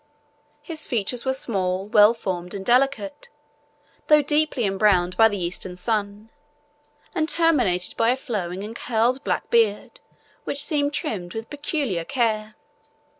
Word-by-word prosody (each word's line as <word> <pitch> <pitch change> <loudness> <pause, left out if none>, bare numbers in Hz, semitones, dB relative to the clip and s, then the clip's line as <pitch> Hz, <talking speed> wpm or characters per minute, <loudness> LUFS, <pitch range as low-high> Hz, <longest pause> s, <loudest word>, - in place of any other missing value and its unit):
His 320 -3 -5
features 235 +1 -1
were 265 - +1
small, 190 -6 -2
well 210 +1 +5
formed, 180 -3 -5
and 195 -1 -6
delicate, 275 - +1 0.8
though 300 -1 +5
deeply 295 -4 0
embrowned 195 -2 +2
by 225 - +6
the 205 - -4
Eastern 180 0 -3
sun, 210 +2 -3 0.8
and 315 0 -1
terminated 255 - +2
by 230 0 +3
a 250 - +2
flowing 195 -8 -4
and 220 +2 -7
curled 240 +4 0
black - - -2
beard, 225 -3 +1 0.4
which 280 +1 +4
seemed 290 -3 0
trimmed 205 - -4
with 225 0 -6
peculiar 285 - -2
care. 215 -2 -1
225 Hz, 135 wpm, -23 LUFS, 195-275 Hz, 0.8 s, by